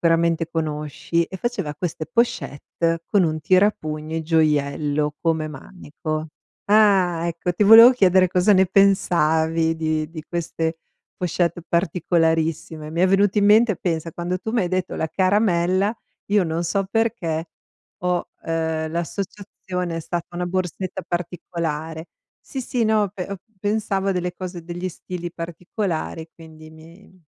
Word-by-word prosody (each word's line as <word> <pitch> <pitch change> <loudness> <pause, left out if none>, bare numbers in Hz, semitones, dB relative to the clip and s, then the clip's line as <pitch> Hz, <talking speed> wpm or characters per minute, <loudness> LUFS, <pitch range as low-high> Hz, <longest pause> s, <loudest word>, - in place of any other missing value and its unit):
Sicuramente 165 0 +2
conosci, 155 +1 -2
e 190 - -8
faceva 195 -9 -3
queste 155 0 -4
pochette 165 - -1
con 200 -3 +4
un 155 -1 -1
tirapugni 160 -3 +1
gioiello 150 -2 +1
come 160 -2 0
manico. 155 0 -6 0.4
Ah, 190 -6 +4
ecco, 170 +1 -2
ti 190 +4 +1
volevo 225 +4 +10
chiedere 190 -6 +4
cosa 180 +3 +3
ne 190 -1 +5
pensavi 165 -4 +3
di 155 -1 -1
di 160 -1 -8
queste 165 0 -3 0.4
pochette 175 -1 -1
particolarissime. 165 -2 0
Mi 170 - -1
è 185 - +4
venuto 200 +2 +3
in 205 - +3
mente, 215 +1 +5
pensa, 165 -2 -3
quando 175 +2 -3
tu 220 +4 -5
mi 235 - +2
hai 180 - 0
detto 185 0 -2
la 160 - -2
caramella, 185 +1 +2 0.3
io 205 -2 +3
non 165 +1 -2
so 190 +3 -1
perché 190 -8 -1 0.5
ho 180 -1 0 0.2
ehm, 160 -1 -2
l'associazione 180 0 -4
è - - -3
stata 165 +1 -4
una 180 0 -2
borsetta 185 +1 -3
particolare. 165 -2 -4 0.3
Sì, 270 - -6
sì, 245 -2 -1
no 215 -2 +2
pe 185 -3 -5
ho 200 - -3 0.2
pensavo 205 -1 -1
a - - +2
delle 180 -1 -2
cose, 180 -2 -7
degli 175 +2 -5
stili 175 0 -7
particolari, 165 -1 -4
quindi 155 -1 -14
mi 165 +4 -17
175 Hz, 140 wpm, -22 LUFS, 160-190 Hz, 0.5 s, volevo